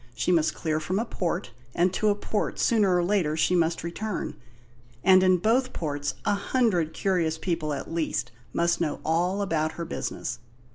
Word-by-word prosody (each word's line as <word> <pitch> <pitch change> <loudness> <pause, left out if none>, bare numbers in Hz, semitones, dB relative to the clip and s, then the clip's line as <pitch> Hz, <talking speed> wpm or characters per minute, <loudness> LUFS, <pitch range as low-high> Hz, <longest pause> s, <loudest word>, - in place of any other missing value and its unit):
She 120 - 0
must 165 -3 +2
clear 155 -2 -1
from 175 +5 -2
a 225 - 0
port, 180 -4 -3 0.2
and 180 +2 +2
to 215 +2 +2
a 205 - +3
port 205 +1 -2
sooner 205 -6 +3
or 175 - +2
later 175 -5 +1
she 180 +3 +3
must 165 -1 +1
return; 190 +4 -4 0.7
and 185 -1 +7
in 185 -1 +5
both 240 +7 +1
ports 145 -3 -3
a 205 - +3
hundred 200 -6 +1
curious 165 -3 0
people 165 -3 -2
at 145 +3 -4
least 165 -6 -1 0.2
must 170 0 +1
know 155 -3 -1
all 180 +5 +1
about 160 -4 0
her 170 - -5
business. 125 -6 -4
175 Hz, 180 wpm, -26 LUFS, 160-195 Hz, 0.7 s, and